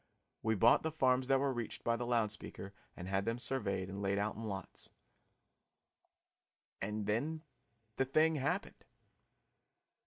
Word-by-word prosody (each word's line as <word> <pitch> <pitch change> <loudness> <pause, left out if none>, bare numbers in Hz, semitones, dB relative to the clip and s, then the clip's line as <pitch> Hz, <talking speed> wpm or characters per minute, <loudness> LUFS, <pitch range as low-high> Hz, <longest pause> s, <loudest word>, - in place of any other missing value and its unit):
We 110 0 +1
bought 115 +4 +6
the 160 - -1
farms 130 -4 +2
that 135 0 +4
were 140 -1 +1
reached 120 -3 -5
by 115 - +2
the 120 0 -3
loud 115 -3 +2
speaker 100 -1 -7 0.2
and 90 - -6
had 95 +1 +1
them 115 +1 0
surveyed 100 -7 -1
and 100 +1 -5
laid 100 0 +1
out 105 +1 0
in 110 - -7
lots 100 -4 -6 1.9
and 105 +1 -2
then 145 +10 -1 0.5
the 135 - +2
thing 155 +4 +4
happened! 175 +10 -2
115 Hz, 150 wpm, -35 LUFS, 100-135 Hz, 1.9 s, bought